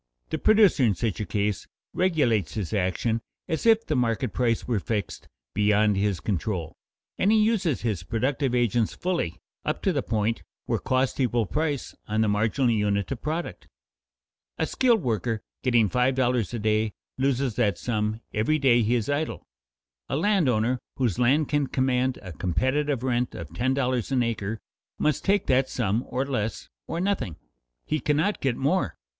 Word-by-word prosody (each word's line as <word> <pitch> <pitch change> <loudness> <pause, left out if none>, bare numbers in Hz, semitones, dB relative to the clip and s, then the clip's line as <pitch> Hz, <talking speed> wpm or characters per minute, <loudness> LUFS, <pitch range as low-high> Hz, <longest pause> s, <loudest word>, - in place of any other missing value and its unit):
The - - -1
producer 215 -8 +5
in 110 -5 +3
such 110 +2 -2
a 105 - -3
case 105 -1 -1 0.3
regulates 145 - +1
his 105 -2 -3
action 105 +4 0 0.3
as 160 +7 -1
if 225 0 +5
the 155 - -1
market 120 -1 0
price 115 -3 0
were 120 -4 +1
fixed 105 -1 -4 0.3
beyond 105 0 +3
his 100 -2 0
control, 90 -4 -2 0.4
and 200 - +3
he 220 - +5
uses 210 - +1
his 105 -7 -1
productive 125 - -1
agents 120 -2 +1
fully 170 - -2 0.3
up - - -2
to - - +2
the - - 0
point 110 +1 -1 0.2
where - - 0
costs 130 +1 0
equal 120 -3 +2
price 150 +4 -2
on 110 +1 0
the 110 - +3
marginal 110 +5 +2
unit 105 -1 0
of 130 - -4
product. 155 - -4 0.9
A - - +1
skilled 235 -7 +2
worker 115 -1 -1 0.2
getting 120 -4 +3
five 125 +6 +1
dollars 125 -4 +1
a 120 - -3
day 110 0 +1 0.3
loses 135 -2 +1
that 105 -7 +2
sum 110 -1 -2
every 115 +9 +2
day 130 -5 +4
he 115 +2 +2
is 115 -3 -1
idle. 145 +2 -2 0.6
A - - -1
landowner 130 - +2 0.2
whose 120 -7 0
land 135 +5 +3
can 145 -2 +1
command 130 -1 +1
a 90 -2 -7
competitive 130 - 0
rent 125 -1 0
of - - -8
ten 130 +2 0
dollars 130 -2 0
an 130 -2 +3
acre 110 -2 -2 0.4
must 150 -3 0
take 200 +1 +2
that 130 0 +2
sum 115 0 0
or 130 +2 -1
less, 115 -6 -3 0.2
or 165 - -3
nothing; 180 - -1 0.5
he 155 - -1
cannot 155 +8 0
get 130 -3 0
more. 165 +8 0
120 Hz, 170 wpm, -26 LUFS, 110-140 Hz, 0.9 s, producer